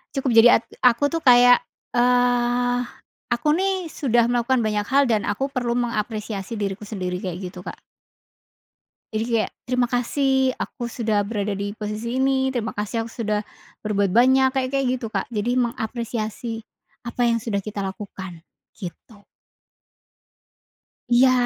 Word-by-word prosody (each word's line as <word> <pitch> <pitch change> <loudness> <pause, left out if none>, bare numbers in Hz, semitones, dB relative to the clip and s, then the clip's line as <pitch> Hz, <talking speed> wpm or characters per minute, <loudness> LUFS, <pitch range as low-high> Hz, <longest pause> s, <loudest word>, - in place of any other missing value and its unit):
"cukup 270 -2 0
jadi 240 - +8
at - - -20 0.2
aku" 250 +3 +3
tuh 330 - 0
kayak, 245 -3 +7 0.3
eee, 245 0 +2 0.5
aku 240 +4 -1
nih 380 -3 -1
sudah 240 -4 +2
melakukan 245 0 +1
banyak 210 -1 -1
hal 280 +1 +4
dan 225 -5 +1
aku 270 +7 -1
perlu 245 -3 -1
mengapresiasi 215 -3 -3
diriku 205 0 -4
sendiri 185 -4 -3
kayak 185 0 -5
gitu, 180 - -10
Kak. - - -6 1.4
Jadi 215 0 0 0.2
kayak, 215 - -2
terima 250 -1 +1
kasih 265 +2 +1
aku 240 -3 -5
sudah 220 -4 0
berada 205 -1 -2
di 200 +1 -3
posisi 220 +4 -3
ini. 265 0 +2
Terima 230 -4 -3
kasih 225 +2 -2
aku - - -13
sudah 210 -1 0 0.4
berbuat 200 -3 0
banyak, 260 +4 +5
kayak-kayak 265 0 0
gitu, 230 - -4
Kak. 200 -3 -3
Jadi 220 +1 -1
mengapresiasi 230 -1 -3 0.5
apa 240 +1 -1
yang 235 -1 +2
sudah 205 -3 -2
kita 210 0 -6
lakukan 190 -3 -6 0.3
gitu. 200 +3 -10 1.9
Iya. 250 +2 +6
235 Hz, 140 wpm, -23 LUFS, 210-250 Hz, 1.9 s, jadi